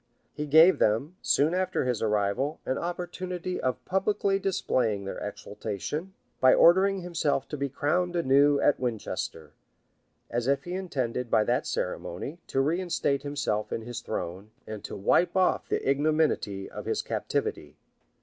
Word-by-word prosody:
He 150 0 -4
gave 160 +5 +7
them, 135 +12 +1
soon 150 +4 +2
after 185 -5 0
his 125 -3 -1
arrival, 105 +7 0
an 130 - -1
opportunity 180 +1 -4
of 130 0 -2
publicly 195 +1 +1
displaying 120 - 0
their 95 - -5
exultation, 115 - -5 0.2
by 130 0 +6
ordering 190 +3 +5
himself 160 -6 -1
to - - -3
be 140 0 -2
crowned 175 +6 0
anew 145 -2 +4
at 145 - +3
Winchester; 105 - -4 0.8
as 120 +1 -1
if 140 0 +1
he 175 - -6
intended, 130 -10 -2
by 110 -1 +4
that - - 0
ceremony, 140 - -4
to 135 - +1
reinstate 160 -2 0
himself 140 -7 -2
in 115 - -3
his 120 0 -6
throne, 95 -1 -5 0.2
and 110 -2 -7
to - - -6
wipe 170 - +2
off 185 -1 +2
he - - +2
ignominity 140 -8 0
of - - -8
his - - -1
captivity. - - -3
140 Hz, 150 wpm, -28 LUFS, 115-175 Hz, 0.8 s, gave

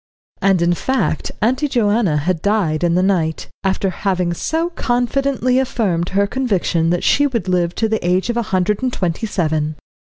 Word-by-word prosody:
And 190 -3 +3
in 175 0 +3
fact 260 -3 -1
Auntie 260 +6 +2
Joanna 215 - +1
had 165 +2 -1
died 190 -7 0
in 170 -1 +2
the 180 - +2
night, 170 -5 0
after 190 0 0
having 180 -2 -1
so 325 - -2
confidently 255 -1 0
affirmed 200 -10 -1
her 200 +1 +2
conviction 200 -8 0
that 175 0 0
she 285 0 +3
would 230 -9 -3
live 175 -2 0
to 225 - +1
the 220 0 -1
age 180 +3 +1
of 235 - -4
a - - +2
hundred 190 +3 +1
and 255 -1 0
twenty 180 +1 -2
seven. 155 -5 -1
195 Hz, 175 wpm, -18 LUFS, 175-240 Hz, -, And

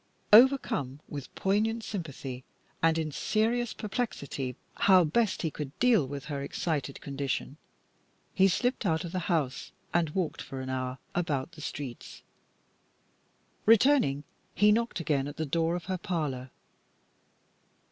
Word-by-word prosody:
Overcome 215 - +5
with 140 -3 -8
poignant 220 +4 +1
sympathy, 140 -10 -5 0.4
and 165 0 +4
in 155 -1 -1
serious 225 +8 0
perplexity 195 - -3 0.2
how 185 -2 +6
best 190 +6 +1
he 160 - 0
could 145 -1 -6
deal 230 - +4
with 140 0 -6
her 140 -2 -4
excited 140 -1 -3
condition, 140 0 -3 0.8
he 190 0 +5
slipped 245 +8 0
out 160 -3 +1
of 170 - -6
the 185 - -1
house 150 -7 -1 0.2
and 170 -2 +2
walked 170 0 -2
for 135 -1 -7
an 130 0 -4
hour 130 0 -2 0.2
about 155 -4 -1
the 155 -2 -12
streets. 140 -5 -7 1.4
Returning, 225 - +5 0.3
he 210 0 +5
knocked 230 -1 +1
again 145 -4 0
at 145 - -8
the 160 - -1
door 165 +3 +1
of 175 - -5
her 185 -1 -2
parlour. 145 -8 -3
160 Hz, 135 wpm, -29 LUFS, 140-205 Hz, 1.4 s, how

